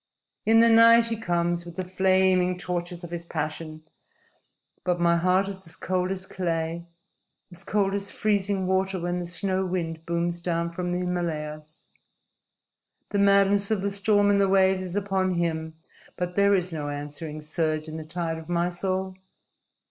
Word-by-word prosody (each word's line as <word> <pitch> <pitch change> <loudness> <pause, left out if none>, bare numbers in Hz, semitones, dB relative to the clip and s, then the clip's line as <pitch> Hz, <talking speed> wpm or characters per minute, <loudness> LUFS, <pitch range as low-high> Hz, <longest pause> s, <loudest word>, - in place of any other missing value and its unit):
In 225 +1 +6
the 230 - +6
night 230 0 +7
he 230 - -1
comes, 175 -5 -1
with 170 -1 -10
the 185 - -3
flaming 185 -1 +2
torches 175 0 -4
of 170 - -8
his 170 -1 -4
passion; 155 -1 -5 1.0
but 180 -1 0
my 170 0 +3
heart 185 +3 +2
is 190 -2 -6
as 160 - -8
cold 185 0 -1
as 190 -1 -3
clay, 170 -2 -3 0.6
as 175 +1 -8
cold 195 -1 0
as 200 0 -3
freezing 200 -2 0
water 190 0 0
when 175 +1 -2
the 175 - -5
snow 190 +2 -1
wind 165 -3 -3
booms 170 0 -1
down 170 -1 -1
from 180 +1 -3
the 175 - 0
Himalayas. 155 -4 -4 1.3
The 205 - 0
madness 200 0 +4
of 210 -3 0
the 200 - 0
storm 205 0 +3
and 200 0 +3
the 195 - +3
waves 190 -1 +4
is 185 -1 -6
upon 190 -2 0
him, 160 -2 -2 0.4
but 180 0 -3
there 200 0 +4
is 180 -1 -1
no 150 -3 -4
answering 145 +2 -6
surge 155 0 -2
in 155 0 -6
the 160 - -6
tide 165 0 -4
of 160 +1 -12
my 175 0 +1
soul. 185 +1 -3
180 Hz, 170 wpm, -26 LUFS, 170-195 Hz, 1.3 s, night